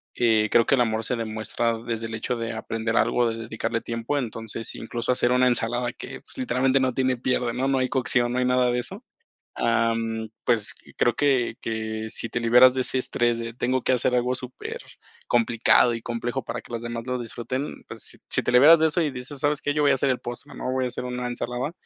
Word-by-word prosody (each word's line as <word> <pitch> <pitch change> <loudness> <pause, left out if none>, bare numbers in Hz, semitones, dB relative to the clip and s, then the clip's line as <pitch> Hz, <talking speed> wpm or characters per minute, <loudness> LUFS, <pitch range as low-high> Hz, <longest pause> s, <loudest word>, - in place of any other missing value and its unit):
Eh, 110 -3 +3
creo 115 -1 +5
que - - +4
el 125 - +2
amor 110 -1 0
se - - -1
demuestra 115 +1 -2
desde 115 -1 -2
el 110 - -8
hecho 115 +3 -2
de 115 0 -3
aprender 115 0 -3
algo, 120 -1 +3
de - - -5
dedicarle 115 0 -3
tiempo, 115 +5 -3
entonces, 115 -2 -6
incluso 115 +2 -3
hacer 125 -1 +2
una 125 0 +4
ensalada 120 0 0
que, - - -9
pues, - - -9
literalmente 135 - +2
no 130 -1 +1
tiene 130 0 +1
pierde, 125 -1 0
¿no?, 130 +3 -1
no 135 -1 +2
hay 130 0 0
cocción, 120 -2 +2
no - - -1
hay 125 - +1
nada 125 0 +3
de 120 - 0
eso. 195 - -6 0.5
Ah, 115 0 +2
mm 115 -1 -3 0.2
pues, 115 -4 +1 0.2
creo 120 -1 +2
que 130 -5 +1
que 110 -1 -4
si 115 - -4
te 120 - -2
liberas 125 +2 +7
de 130 - 0
ese 130 - 0
estrés 120 -2 0
de 115 0 -5
tengo 125 +2 0
que - - +1
hacer 125 0 +1
algo 125 +1 +1
supercomplicado 120 -1 0
y 115 - -6
complejo 120 +2 -3
para - - -5
que - - -16
los 115 - -3
demás 120 0 -4
lo 125 0 -1
disfruten, 120 +4 -5
pues, - - -6
si - - +1
te - - 0
liberas 145 +7 +8
de 160 - +5
eso 155 +2 +1
y 155 -3 0
dices, 130 +2 -6
¿sabes 145 +1 +1
qué?, 145 - 0
yo 150 0 +1
voy 140 - +5
a - - +4
hacer 135 +1 +1
el 130 - +1
postre, 120 0 -8
¿no?, - - -4
voy 130 0 0
a - - -1
hacer 125 - -5
una 125 0 -3
ensalada, 125 +3 -3
120 Hz, 230 wpm, -25 LUFS, 115-130 Hz, 0.5 s, liberas